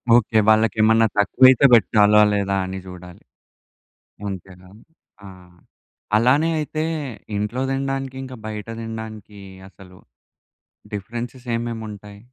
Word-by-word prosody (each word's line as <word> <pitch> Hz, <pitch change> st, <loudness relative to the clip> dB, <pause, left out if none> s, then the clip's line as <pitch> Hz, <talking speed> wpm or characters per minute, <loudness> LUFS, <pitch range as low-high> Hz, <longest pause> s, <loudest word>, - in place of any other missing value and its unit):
Okay 110 Hz, -1 st, +3 dB
వాళ్ళకేమన్నా 110 Hz, +1 st, +3 dB
తక్కువైతే 130 Hz, +5 st, +5 dB
పెట్టాలా, 105 Hz, -2 st, +5 dB
లేదా 100 Hz, -1 st, -1 dB
అని 95 Hz, 0 st, -6 dB
చూడాలి. 90 Hz, -1 st, -12 dB, 1.1 s
అంతేగాని 95 Hz, +2 st, -11 dB, 0.4 s
ఆ! -, -, -10 dB, 0.9 s
అలానే 135 Hz, +8 st, +3 dB
అయితే 155 Hz, +1 st, -3 dB, 0.5 s
ఇంట్లో 105 Hz, +5 st, -3 dB
తినడానికి, 135 Hz, -1 st, -3 dB
ఇంకా 130 Hz, -1 st, -9 dB
బయట 105 Hz, -1 st, -6 dB
తినడానికి 110 Hz, -2 st, -8 dB, 0.3 s
అసలు 90 Hz, -2 st, -17 dB, 1.0 s
డిఫరెన్స్‌సేమేముంటాయి? 115 Hz, -2 st, -6 dB
110 Hz, 90 wpm, -21 LUFS, 100-120 Hz, 1.1 s, తక్కువైతే